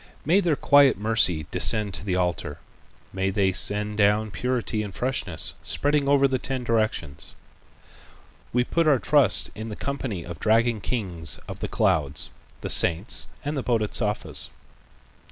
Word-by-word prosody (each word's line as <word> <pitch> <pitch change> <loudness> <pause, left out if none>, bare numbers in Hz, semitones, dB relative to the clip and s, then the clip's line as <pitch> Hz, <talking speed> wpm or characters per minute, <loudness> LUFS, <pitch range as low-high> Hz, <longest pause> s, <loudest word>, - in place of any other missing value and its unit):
May 170 +7 +4
their 170 -6 +1
quiet 140 -1 +5
mercy 105 -7 +1
descend 105 -3 +1
to - - -3
the 95 -3 -1
altar; 90 -2 -2 0.6
may 95 0 -1
they 95 -1 +1
send 105 +2 0
down 105 +1 +2
purity 125 -2 -2
and 100 -3 -7
freshness, 105 - 0
spreading 145 -1 0
over 140 -1 +4
the 130 -1 -1
ten 130 -2 -4
directions. 110 - -1 1.2
We 125 0 +2
put 165 +5 0
our 145 -3 +5
trust 135 -6 +4
in 110 +1 -7
the 105 - -6
company 130 -11 -4
of 85 -3 -8
dragon 115 0 +2
kings 90 -11 -2
of - - -8
the - - -3
clouds, 70 -2 0 0.3
the - - -4
saints 85 +8 +1 0.2
and 145 +1 -2
the 135 - -1
Bodhisattvas." 110 -3 -1
110 Hz, 150 wpm, -24 LUFS, 95-130 Hz, 1.2 s, quiet